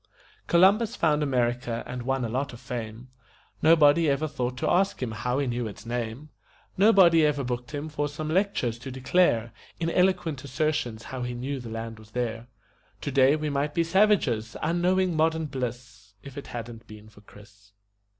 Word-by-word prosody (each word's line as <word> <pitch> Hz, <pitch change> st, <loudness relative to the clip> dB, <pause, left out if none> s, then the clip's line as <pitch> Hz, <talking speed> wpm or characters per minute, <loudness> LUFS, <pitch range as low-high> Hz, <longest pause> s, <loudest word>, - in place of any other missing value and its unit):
Columbus 205 Hz, +7 st, +4 dB
found 155 Hz, -6 st, +2 dB
America 120 Hz, -3 st, -1 dB
and 125 Hz, 0 st, -6 dB
won 135 Hz, 0 st, -1 dB
a -, -, -2 dB
lot 130 Hz, +4 st, -3 dB
of 120 Hz, -, -10 dB
fame 120 Hz, -1 st, -7 dB, 0.5 s
Nobody 160 Hz, 0 st, +5 dB
ever 140 Hz, +3 st, 0 dB
thought 125 Hz, -4 st, -3 dB
to -, -, -2 dB
ask 195 Hz, +2 st, +2 dB
him 125 Hz, -3 st, -3 dB
how 125 Hz, +4 st, -2 dB
he 140 Hz, -, 0 dB
knew 120 Hz, -2 st, -2 dB
its 105 Hz, +1 st, -10 dB
name; 120 Hz, +4 st, -4 dB, 0.5 s
Nobody 190 Hz, -5 st, +6 dB
ever 145 Hz, -2 st, +1 dB
booked 125 Hz, -1 st, -4 dB
him 150 Hz, 0 st, -5 dB
for 145 Hz, -1 st, -2 dB
some 150 Hz, +2 st, -5 dB
lectures 155 Hz, -, 0 dB
to 135 Hz, -, -8 dB
declare 130 Hz, -3 st, +1 dB, 0.3 s
In 165 Hz, 0 st, -1 dB
eloquent 180 Hz, -7 st, +1 dB
assertions 130 Hz, -5 st, -2 dB
how 130 Hz, -1 st, -6 dB
he 125 Hz, 0 st, -3 dB
knew 135 Hz, +3 st, -4 dB
the 120 Hz, -2 st, -8 dB
land 115 Hz, 0 st, -6 dB
was 110 Hz, -1 st, -16 dB
there. 115 Hz, 0 st, -3 dB, 0.5 s
Today 135 Hz, 0 st, +3 dB
we 155 Hz, -1 st, -2 dB
might 145 Hz, +1 st, -1 dB
be 170 Hz, -, +3 dB
savages, 165 Hz, -, +2 dB
unknowing 180 Hz, +1 st, +1 dB
modern 160 Hz, 0 st, +1 dB
bliss, 120 Hz, -6 st, -6 dB
If 140 Hz, -1 st, -11 dB
it 140 Hz, -, -8 dB
hadn't 115 Hz, -1 st, -8 dB
been 105 Hz, 0 st, -12 dB
for 105 Hz, -1 st, -18 dB
Chris. 105 Hz, 0 st, -18 dB
130 Hz, 175 wpm, -26 LUFS, 120-155 Hz, 0.5 s, Nobody